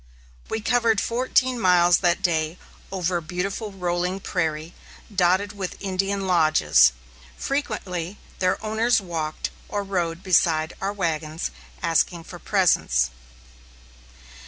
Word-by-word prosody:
We 220 - -2
covered 230 -2 +2
fourteen 255 +2 +1
miles 180 -3 +5
that 180 +1 +1
day 160 -1 0 0.3
over 180 -2 0
a - - -3
beautiful 195 +6 -3
rolling 180 0 -2
prairie, 160 -3 -2 0.4
dotted 190 +3 +2
with 195 -3 -5
Indian 195 0 -1
lodges. 155 - +5 0.5
Frequently 205 - -3 0.2
their 185 -1 +2
owners 225 +2 +2
walked 165 -5 -4 0.2
or 205 -1 -2
rode 175 -3 -2
beside 165 -3 +2
our 195 - -1
wagons, 165 -4 -2 0.3
asking 165 +1 +1
for 175 +1 -10
presents. 65 - +2
180 Hz, 110 wpm, -24 LUFS, 165-200 Hz, 0.5 s, miles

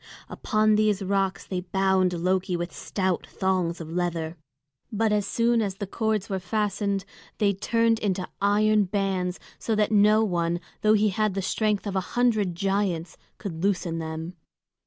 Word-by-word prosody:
Upon 215 -1 +1
these 210 -2 +2
rocks 195 0 0
they 185 -2 -3
bound 190 0 +1
Loki 180 +1 0
with 175 0 -4
stout 190 -3 -2
thongs 185 -3 -1
of 160 -1 -7
leather. 170 -2 -2 0.6
But 220 0 +1
as 210 -1 +1
soon 235 0 +2
as 200 -3 -2
the 200 - -4
cords 220 +1 -1
were 195 -2 -2
fastened 200 0 -1 0.3
they 205 -2 +2
turned 230 +3 +1
into 190 -4 -1
iron 210 +1 +3
bands, 190 -2 -1 0.2
so 225 - -1
that 210 0 +1
no 210 +1 +5
one, 175 -4 0 0.2
though 215 0 +4
he 210 0 +3
had 210 0 0
the 195 - 0
strength 210 +2 0
of 200 -1 -3
a - - +3 0.2
hundred 215 -7 +2
giants, 195 -3 -1 0.2
could 175 -5 -6
loosen 180 -4 0
them. 160 +2 -5
195 Hz, 160 wpm, -26 LUFS, 180-215 Hz, 0.6 s, no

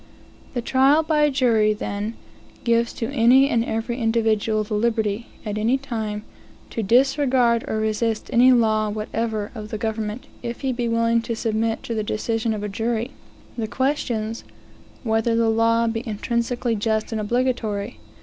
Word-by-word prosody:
The 245 - -1
trial 270 +6 +4
by 300 -1 +3
jury, 230 -6 +3
then, 210 +1 -4 0.5
gives 235 0 +2
to 230 +2 -4
any 265 +1 +5
and 230 -4 +1
every 235 +2 -3
individual 220 -1 +1
the 215 +1 -6
liberty, 220 0 0 0.2
at 210 0 -3
any 235 +5 +2
time, 220 -6 -4 0.5
to 225 - -2
disregard 250 +1 +3
or 220 - -1
resist 220 +1 -1
any 250 +2 +6
law 220 -3 +3
whatever 215 0 -3
of 215 -3 -7
the 215 - -4
government, 220 +1 -3 0.2
if 235 -1 -5
he 265 -1 0
be 240 -1 -2
willing 230 0 +2
to 230 0 -3
submit 225 0 -1
to 235 - -4
the 220 - -1
decision 220 +1 -1
of 205 - -5
a - - -2
jury, 225 +4 -2 0.4
the 225 -2 -3
questions, 235 -4 -1 0.6
whether 225 0 +1
the 230 0 +2
law 230 +1 +3
be 225 0 -1
intrinsically 235 +2 -1
just 220 +1 -1
and 220 -1 -2
obligatory? 225 -2 -1
230 Hz, 160 wpm, -23 LUFS, 215-240 Hz, 0.6 s, any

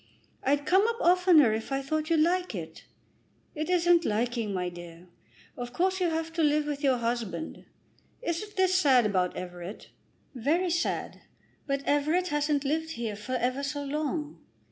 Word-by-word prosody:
"I'd 285 +1 +1
come 385 +6 +4
up 465 - 0
oftener 350 - +5
if 220 +4 -4
I 270 0 -1
thought 310 +3 -2
you'd 325 -2 +3
like 360 +3 +1
it." - - -8 0.7
"It 310 +2 -4
isn't 350 -1 +4
liking, 230 -2 -1
my 180 -2 -2
dear. 175 -1 -10 0.5
Of 245 0 -6
course 375 +5 +1
you 350 - +2
have 325 0 -3
to 330 - -1
live 300 0 +3
with 295 0 -4
your 265 -3 +3
husband. 235 - -3 0.6
Isn't 410 +3 -3
this 375 -1 +3
sad 275 -10 +5
about 185 -3 0
Everett?" 180 +2 -8 0.4
"Very 320 +9 0
sad. 340 +1 -2 0.5
But 275 0 -1
Everett 310 +6 +1
hasn't 295 -1 0
lived 320 +3 -1
here 230 -5 -4
for 215 +5 -6
ever 255 +2 0
so 285 +1 -3
long." 300 +1 -3
290 Hz, 165 wpm, -28 LUFS, 240-335 Hz, 0.7 s, oftener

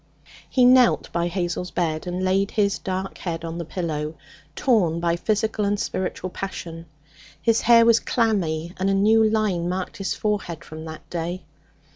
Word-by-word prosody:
He 255 -2 +4
knelt 250 -1 +5
by 170 0 0
Hazel's 175 0 -2
bed 165 -1 -2
and 180 +1 -2
laid 195 +2 +2
his 200 -2 +1
dark 190 0 -4
head 165 -2 -4
on 165 +1 -5
the 170 - -4
pillow, 155 -2 -3 0.4
torn 180 -10 +2
by 170 0 +1
physical 215 +3 0
and 205 0 0
spiritual 185 -1 -3
passion. 170 -4 -6 0.5
His 225 +7 +2
hair 230 0 +6
was 230 0 +5
clammy, 175 -8 0
and 190 +1 +1
a 195 - +2
new 220 +3 +4
line 200 -6 0
marked 185 0 -4
his 195 - -2
forehead 200 -6 -2
from 160 0 -9
that 160 -1 -9
day. 175 +2 -3
185 Hz, 165 wpm, -23 LUFS, 170-210 Hz, 0.5 s, hair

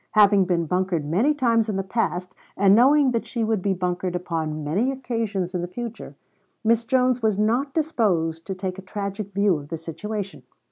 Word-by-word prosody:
Having 205 -2 +5
been 175 -2 0
bunkered 180 -2 -1
many 195 - +2
times 230 -5 +2
in 210 - -1
the 195 - -1
past, 185 -3 -2 0.2
and 195 0 +5
knowing 270 +4 +5
that 230 -2 -1
she 235 -3 -2
would 220 -3 0
be 195 0 0
bunkered 180 0 -2
upon 160 -3 -3
many 200 - 0
occasions 225 -8 -3
in 180 - -1
the 175 - -3
future, 235 +4 -7 0.5
Miss 230 +1 +2
Jones 255 0 +2
was 215 -3 +1
not 240 +6 +1
disposed 185 - 0
to 190 - -3
take 185 0 -4
a - - -7
tragic 200 +1 -5
view 200 -3 +2
of 145 - -11
the 165 - -3
situation. 195 +5 -5
200 Hz, 190 wpm, -24 LUFS, 180-230 Hz, 0.5 s, Having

